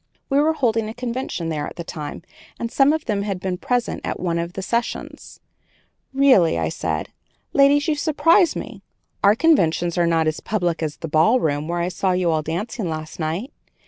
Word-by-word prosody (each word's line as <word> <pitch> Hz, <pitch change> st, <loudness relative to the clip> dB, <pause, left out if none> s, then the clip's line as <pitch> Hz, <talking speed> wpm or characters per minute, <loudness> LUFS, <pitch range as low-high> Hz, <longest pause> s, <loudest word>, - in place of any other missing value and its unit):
We 275 Hz, -, +4 dB
were 310 Hz, +2 st, +3 dB
holding 225 Hz, -7 st, 0 dB
a 220 Hz, -, -8 dB
convention 245 Hz, -8 st, -3 dB
there 150 Hz, -2 st, -2 dB
at -, -, -9 dB
that 170 Hz, -, -6 dB
time, 155 Hz, -1 st, -7 dB, 0.4 s
and 235 Hz, 0 st, -3 dB
some 275 Hz, +1 st, +4 dB
of 315 Hz, 0 st, -2 dB
them 210 Hz, -4 st, -1 dB
had 200 Hz, -2 st, -3 dB
been 180 Hz, -1 st, -3 dB
present 245 Hz, -1 st, -1 dB
at -, -, -3 dB
one 170 Hz, -2 st, -1 dB
of 170 Hz, +1 st, -4 dB
the 190 Hz, -, -5 dB
sessions. 235 Hz, +4 st, -4 dB, 0.7 s
"Really," 265 Hz, -, +4 dB
said 80 Hz, -1 st, -3 dB
I, -, -, -35 dB, 0.4 s
"ladies, 285 Hz, +2 st, +4 dB
you 315 Hz, -, +3 dB
surprise 330 Hz, +4 st, +3 dB
me; -, -, -7 dB, 0.4 s
our 200 Hz, +1 st, +6 dB
conventions 175 Hz, -, +2 dB
are 170 Hz, -, +3 dB
not 165 Hz, -1 st, +2 dB
as 155 Hz, 0 st, -1 dB
public 175 Hz, -6 st, -1 dB
as 155 Hz, -2 st, -3 dB
the 165 Hz, -, -6 dB
ballroom 155 Hz, -, +2 dB
where 175 Hz, 0 st, -1 dB
I 175 Hz, -, 0 dB
saw 185 Hz, +1 st, 0 dB
you 180 Hz, -2 st, +1 dB
all 155 Hz, -1 st, +1 dB
dancing 175 Hz, +5 st, -3 dB
last 155 Hz, +1 st, -6 dB
night. 170 Hz, -, -3 dB
185 Hz, 195 wpm, -22 LUFS, 165-250 Hz, 0.7 s, our